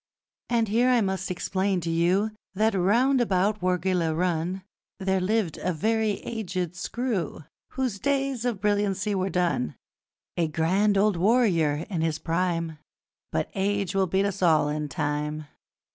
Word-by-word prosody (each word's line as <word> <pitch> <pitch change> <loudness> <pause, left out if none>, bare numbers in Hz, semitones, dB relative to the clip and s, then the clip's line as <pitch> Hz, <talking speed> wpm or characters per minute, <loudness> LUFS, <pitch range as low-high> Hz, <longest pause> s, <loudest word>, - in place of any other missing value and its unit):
And 230 -2 +2
here, 240 +4 +3
I 250 -1 +4
must 190 -2 -2
explain 190 +1 0
to 165 0 -2
you 180 +6 +2 0.2
That, 220 +2 +2
round 235 +8 +3
about 205 -1 +1
Wargeilah 180 -3 +1
run, 180 +1 -1 0.3
There 190 -1 0
lived 200 -3 0
a 180 - -1
very 220 +5 +1
aged 185 -6 -3
screw 195 - -3 0.3
Whose 255 -7 -2
days 275 -2 0
of 240 -5 -1
brilliancy 205 0 0
were 190 0 0
done: 175 -9 0 0.6
A 170 -2 +2
grand 190 +7 +2
old 200 -2 +3
warrior 170 -7 +2
in 175 -6 -2
his 160 -1 0
prime 165 -1 -1 0.5
But 80 - -1
age 200 -1 -1
will 195 -1 +2
beat 190 +3 +1
us 200 -1 -3
all 155 -4 +4
in 150 0 -3
time. 150 +1 -2
190 Hz, 145 wpm, -26 LUFS, 165-210 Hz, 0.6 s, I